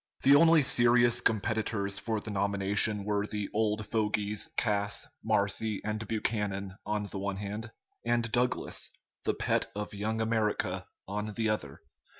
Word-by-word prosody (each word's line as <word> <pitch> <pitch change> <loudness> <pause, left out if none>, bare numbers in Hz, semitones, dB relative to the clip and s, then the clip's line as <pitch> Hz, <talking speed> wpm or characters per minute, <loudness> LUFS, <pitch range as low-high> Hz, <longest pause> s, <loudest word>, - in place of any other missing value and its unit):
The 135 - +7
only 160 0 +7
serious 120 -1 +4
competitors 105 -3 0
for 110 -1 -2
the 105 - -7
nomination 100 +1 0
were 105 0 0
the 105 -2 -4
"old 105 0 0
fogies" 105 -1 0
Cass, 100 -2 0 0.2
Marcy, 105 0 +1
and 105 0 -3
Buchanan 100 -3 -2
on 105 0 -1
the 100 -1 -6
one 100 0 -2
hand, 105 +3 -5 0.3
and 120 -1 +1
Douglas, 125 +2 0 0.4
the - - +1
pet - - +1
of 105 0 -4
"Young 110 +2 -2
America," 110 -1 0 0.2
on 105 +1 -4
the 110 -1 +1
other. 75 -10 -3
105 Hz, 145 wpm, -30 LUFS, 100-110 Hz, 0.4 s, The